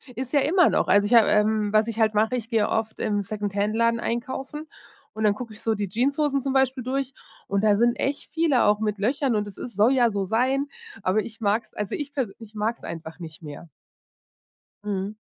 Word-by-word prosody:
Ist 260 +1 -5
ja 285 - +4
immer 350 +4 +4
noch. - - +1
Also, 205 0 +4
ich 215 - 0
habe 230 -3 +7
ähm, 210 0 +2
was 215 +1 +4
ich 230 -1 -4
halt 220 -1 +3
mache, 220 +4 +2
ich 230 -2 -4
gehe 225 -3 +1
oft 220 0 -2
im 205 -2 0
Second-Hand-Laden 210 +3 0
einkaufen 265 +6 -4 0.5
und 220 - -4
dann 210 -1 +4
gucke 230 +1 -8
ich 215 - -12
so 225 - +1
die 205 -2 -3
Jeanshosen 275 +6 +1
zum 270 0 -2
Beispiel 265 -1 +1
durch 265 +1 -2 0.3
und 200 +1 0
da 210 -1 +5
sind 235 +3 +3
echt 280 +2 -3
viele 320 -7 +2
auch 210 0 +3
mit 210 -2 -2
Löchern 255 +3 +1
und 210 -1 0
das 200 - -11
ist 240 - -8
soll 215 +6 +4
ja 245 -3 +4
so 200 -1 -1
sein, 260 +8 +1 0.3
aber 190 +3 +1
ich 225 0 -10
mag's 210 +2 0
also, 210 -2 -3
ich 290 -1 -5
persö 250 -9 -2
ich 225 -2 -12
mag‘s 220 +2 -2
einfach 165 0 -7
nicht 160 -2 -9
mehr. 150 +1 -10 1.1
Mhm. 205 0 -3
220 Hz, 215 wpm, -25 LUFS, 205-255 Hz, 1.1 s, habe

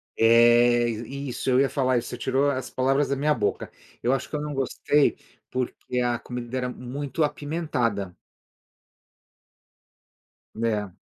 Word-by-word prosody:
É, 120 +1 +5
isso, 130 +3 -4
eu 130 +1 +4
ia 140 - +4
falar 130 -3 +1
isso, 120 - -3
você 125 - -6
tirou 135 +3 +1
as 130 -2 -4
palavras 135 +2 +1
da 140 - +1
minha 150 +2 +2
boca. 105 -7 -2 0.3
Eu 125 +3 +2
acho 135 - -2
que - - -5
eu 150 - -2
não 150 -1 -4
gostei, 140 +2 +1 0.3
porque 125 0 -3
a 120 -1 0
comida 125 0 -6
era 125 0 -1
muito 135 +5 -3
apimentada. 145 - -2 2.4
Né. 105 -4 -2
125 Hz, 140 wpm, -25 LUFS, 120-140 Hz, 2.4 s, É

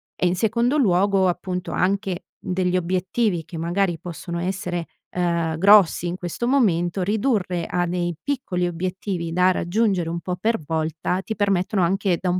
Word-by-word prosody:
e - - -1
in 175 - +1
secondo 235 +8 +1
luogo, 195 -4 +3
appunto, 180 0 -3
anche 195 -1 -1 0.2
degli 180 0 0
obiettivi 180 +1 0
che 170 0 -8
magari 175 +1 0
possono 170 0 -6
essere, 180 -1 -3 0.3
uhm, 170 -2 0
grossi 195 -2 +5
in 175 - -2
questo 180 +7 -3
momento, 190 -9 +2
ridurre 200 -5 0
a 175 0 0
dei 175 -1 -2
piccoli 250 -11 -1
obiettivi 175 0 -3
da 180 +1 +4
raggiungere 185 -1 0
un 170 0 -3
po' 180 +2 -3
per 225 +3 0
volta, 160 +3 -1
ti 220 - -5
permettono 195 -1 +1
anche 190 0 +1
da 185 - 0
un 180 +1 +1
180 Hz, 160 wpm, -23 LUFS, 175-200 Hz, 0.3 s, grossi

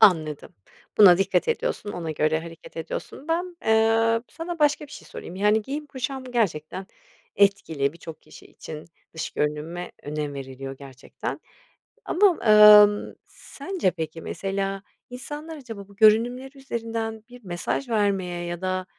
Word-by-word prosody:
Anladım. 155 -6 +3 0.4
Buna 180 -4 +9
dikkat 195 - +1
ediyorsun, 470 - -2
ona 165 -2 -4
göre 155 +1 +1
hareket 165 0 -12
ediyorsun. 265 - -6
Ben, 350 +2 -1
eee, 225 +1 +3
sana 335 0 -6
başka 295 0 +2
bir 285 - -21
şey - - -11
sorayım. 180 - -9
Yani, 210 +2 +3
giyim 290 +5 -5
kuşam 265 -1 -5
gerçekten 190 -7 -2 0.5
etkili 165 -8 +2
birçok 165 -1 -11
kişi - - -15
için. 155 -1 -9 0.3
Dış 160 - -4
görünüme 150 +4 -3
önem 150 -1 -4
veriliyor 135 0 -7
gerçekten. 135 -1 -7 0.7
Ama, 405 +4 +4 0.2
ımm, 210 -1 +8
sence, 335 - -3
peki, 160 0 -6
mesela, 195 +1 -3 0.3
insanlar 295 +6 -7
acaba 225 -8 -9
bu 200 - -18
görünümleri 245 +6 +3
üzerinden 225 -4 -4
bir 245 -2 -14
mesaj 180 +8 -3
vermeye 195 -5 0
ya 175 +1 -5
da 185 0 -2
205 Hz, 135 wpm, -25 LUFS, 165-245 Hz, 0.7 s, Buna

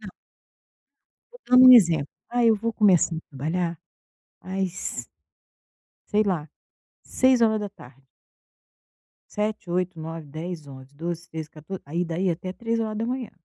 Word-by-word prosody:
não. - - -9 1.2
Tô - - -14
dando 255 +1 +8
um 255 - +12
exemplo: 165 - +5 0.2
"Ah, 240 0 +1
eu 225 -1 +5
vou 230 +2 -3
começar 185 -5 +4
a - - -3
trabalhar 165 +4 -3 0.6
às" 185 -9 -3 1.1
"sei 210 +1 +3
lá, 170 -7 -2 0.6
18h". 215 - +1 1.3
7, 210 -3 -3
8, 180 -1 -1
9, 160 -1 -7
10, 155 +1 -7
11, 130 0 -12
12, 170 +2 -5
13, 160 -1 -6
14 165 +5 -9
aí 170 +5 -2
daí 175 +3 -1
até 180 +2 -4
3h. 230 +2 -2
180 Hz, 120 wpm, -25 LUFS, 160-215 Hz, 1.3 s, um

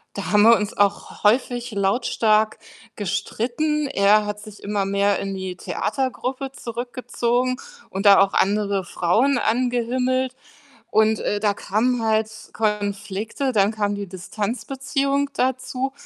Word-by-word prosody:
Da 200 - -4
haben 210 0 +5
wir 230 +2 +8
uns 210 -2 -3
auch 205 +1 0
häufig 245 +2 +2
lautstark 215 +1 +2 0.4
gestritten. 240 - -1
Er 210 -4 +3
hat 210 0 -4
sich 210 -1 -12
immer 200 -1 -1
mehr 200 0 +1
in 195 0 -4
die 190 -1 -5
Theatergruppe 260 +6 -3
zurückgezogen 245 +1 -2 0.3
und 195 +2 0
da 200 - +8
auch 195 - +2
andere 200 -1 +1
Frauen 220 +11 +1
angehimmelt, 250 +2 0 0.6
und, 220 0 +3
äh, 205 0 -1
da 205 -2 +2
kamen 230 +5 0
halt 220 0 +1 0.2
Konflikte, 210 +4 -2
dann 200 -1 +3
kam 205 -2 -1
die 200 0 -5
Distanzbeziehung 270 - -2
dazu 260 +1 -1
215 Hz, 125 wpm, -22 LUFS, 205-255 Hz, 0.6 s, wir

